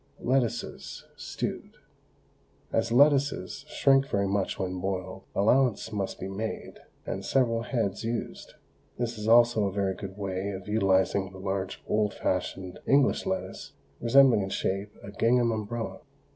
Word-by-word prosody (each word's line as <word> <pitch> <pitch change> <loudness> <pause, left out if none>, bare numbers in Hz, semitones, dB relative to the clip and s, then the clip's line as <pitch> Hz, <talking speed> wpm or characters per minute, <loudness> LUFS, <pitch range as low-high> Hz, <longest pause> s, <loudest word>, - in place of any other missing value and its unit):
LETTUCES, 120 -2 -2
STEWED. - - -5 1.0
As 115 +1 +1
lettuces 140 -6 +3
shrink 135 0 +3
very 100 -4 0
much 100 0 -1
when 90 -1 -3
boiled, 95 0 -4
allowance 115 +1 +2
must 100 -3 -3
be 95 - -4
made, 105 +3 -5 0.3
and - - -4
several 115 -4 +1
heads 115 -5 -2
used. 115 +1 -4 0.4
This 120 -2 -3
is 105 - -4
also 115 -2 +5
a 100 - -1
very 100 0 0
good 95 0 -8
way 95 -1 -3
of 95 0 -8
utilising 95 -2 +2
the 95 - -12
large 95 0 -3
old 105 -1 +1
fashioned 90 0 -3
English 140 0 +3
lettuce 95 - -4 0.3
resembling 130 -2 +5
in 95 - -3
shape 100 +2 -2
a 100 - -8
gingham 115 +3 +2
umbrella. 110 +1 -4
105 Hz, 140 wpm, -28 LUFS, 95-120 Hz, 1.0 s, also